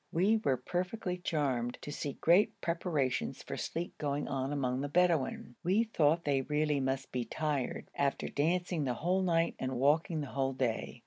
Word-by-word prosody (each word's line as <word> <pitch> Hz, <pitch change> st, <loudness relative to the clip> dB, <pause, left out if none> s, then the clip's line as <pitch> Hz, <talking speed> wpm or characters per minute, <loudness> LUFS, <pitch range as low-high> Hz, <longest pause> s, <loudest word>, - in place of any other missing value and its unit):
We 195 Hz, +7 st, +3 dB
were 130 Hz, -2 st, +2 dB
perfectly 180 Hz, -, -3 dB
charmed 135 Hz, -8 st, -1 dB
to 145 Hz, -, -5 dB
see 145 Hz, -1 st, -3 dB
great 175 Hz, +9 st, +3 dB
preparations 165 Hz, -6 st, -1 dB
for -, -, -5 dB
sleep 170 Hz, +2 st, -4 dB
going 145 Hz, -1 st, -1 dB
on 135 Hz, 0 st, -2 dB
among 130 Hz, -2 st, 0 dB
the 145 Hz, -, -3 dB
Bedouin. 165 Hz, -6 st, +1 dB
We 190 Hz, +6 st, +3 dB
thought 165 Hz, -7 st, +2 dB
they 140 Hz, -2 st, +2 dB
really 150 Hz, +1 st, +1 dB
must 135 Hz, 0 st, -2 dB
be 125 Hz, -1 st, -1 dB
tired 145 Hz, +2 st, -2 dB
after 140 Hz, -1 st, 0 dB
dancing 170 Hz, +2 st, 0 dB
the 125 Hz, -2 st, 0 dB
whole 180 Hz, +8 st, +1 dB
night 170 Hz, -2 st, +2 dB
and 130 Hz, 0 st, -2 dB
walking 155 Hz, +4 st, +2 dB
the -, -, -3 dB
whole 135 Hz, -1 st, 0 dB
day. 125 Hz, -4 st, -2 dB
150 Hz, 175 wpm, -32 LUFS, 135-170 Hz, -, We